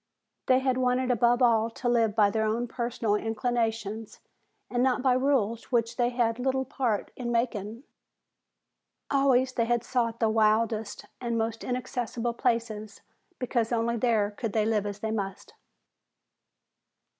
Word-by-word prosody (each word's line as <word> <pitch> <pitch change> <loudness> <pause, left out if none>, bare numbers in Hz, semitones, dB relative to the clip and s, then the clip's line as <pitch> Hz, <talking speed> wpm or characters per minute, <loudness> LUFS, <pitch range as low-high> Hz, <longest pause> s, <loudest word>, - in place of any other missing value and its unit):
They 255 - +5
had 260 -1 +1
wanted 255 0 +1
above 240 +1 +3
all 230 -2 +4
to 245 +2 -5
live 230 -3 +2
by 205 -2 +4
their 220 +1 0
own 235 +3 -1
personal 235 -2 -2
inclinations 225 -1 -2 0.5
and 245 - -1
not 255 0 +2
by 260 -2 +4
rules 255 -4 0
which 235 -1 +1
they 240 -1 +2
had 240 -1 0
little 265 +1 0
part 245 -5 -2
in 240 -2 -4
making. 230 -1 -2 1.3
Always 265 -2 +3
they 230 - +1
had 240 0 +1
sought 235 -3 -1
the 225 - +3
wildest 220 0 +1 0.2
and 235 -2 -1
most 225 0 -2
inaccessible 245 -1 -3
places 230 -4 -2 0.4
because 240 -2 -1
only 235 0 +1
there 220 -3 +1
could 215 0 -4
they 215 -1 +2
live 215 -2 +1
as 205 0 -6
they 220 - -2
must. 200 -3 -4
235 Hz, 145 wpm, -28 LUFS, 220-250 Hz, 1.3 s, They